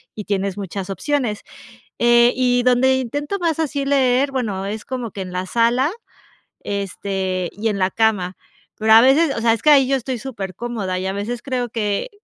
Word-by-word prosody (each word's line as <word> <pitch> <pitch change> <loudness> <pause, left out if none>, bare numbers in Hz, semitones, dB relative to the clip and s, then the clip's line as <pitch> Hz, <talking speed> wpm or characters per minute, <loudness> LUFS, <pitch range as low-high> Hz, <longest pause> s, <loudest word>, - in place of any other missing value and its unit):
y 210 - -5
tienes 195 -1 -2
muchas 195 0 -5
opciones". 240 0 -2 0.6
Eh, 240 0 +5
y 245 -1 +2
donde 255 +1 +3
intento 290 - -3
más 330 -3 0
así 285 -3 -1
leer, 275 0 +2
bueno, 205 -7 -2
es 210 +1 -5
como 250 -3 -4
que 195 - -7
en 185 -1 -6
la 185 +1 -3
sala, 240 +6 +2 0.7
este, 190 -2 -3
y 220 +2 -2
en 205 - -2
la 185 0 +2
cama, 200 -5 0 0.4
pero 220 0 +1
a 225 - +10
veces 275 +4 +4
o - - 0
sea, 225 0 +4
es 225 - -3
que 305 - +3
ahí 275 -3 +6
yo 275 - +2
estoy 260 0 -3
supercómoda 205 -4 -4
y 190 - -4
a 190 - -2
veces 225 +4 -4
creo 250 -2 -3
que 215 - -2
230 Hz, 190 wpm, -20 LUFS, 200-260 Hz, 0.7 s, a